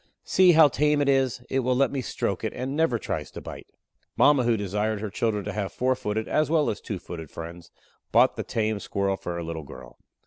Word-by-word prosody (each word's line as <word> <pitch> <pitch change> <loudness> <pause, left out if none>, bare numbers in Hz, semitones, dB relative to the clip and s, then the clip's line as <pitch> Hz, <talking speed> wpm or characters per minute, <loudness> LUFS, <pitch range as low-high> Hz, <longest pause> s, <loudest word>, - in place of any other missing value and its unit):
See 185 -2 +5
how 160 -1 +8
tame 150 +2 +1
it 145 - +1
is. 130 -2 +1
It 135 - 0
will 125 0 +1
let 135 +2 +2
me 135 - -2
stroke - - -3
it, - - -2
and 130 +2 -3
never 160 -6 +2
tries - - -4
to - - -9
bite." - - -9 0.5
Mama, 140 -4 +5
who 115 -1 +2
desired 105 +2 -1
her 105 -1 -5
children 105 -1 -1
to 105 - -4
have 100 -2 -3
four 130 +1 +1
footed, 110 -2 -3
as 155 0 +1
well 155 -2 +2
as 105 - -7
two 100 - -4
footed 80 -3 -8
friends, 85 +1 -9 0.4
bought - - +5
the - - -3
tame 110 -2 -1
squirrel 100 -1 -1
for 90 -2 -5
her 85 - -4
little 80 -1 -5
girl. 70 - -12
115 Hz, 230 wpm, -26 LUFS, 100-135 Hz, 0.5 s, how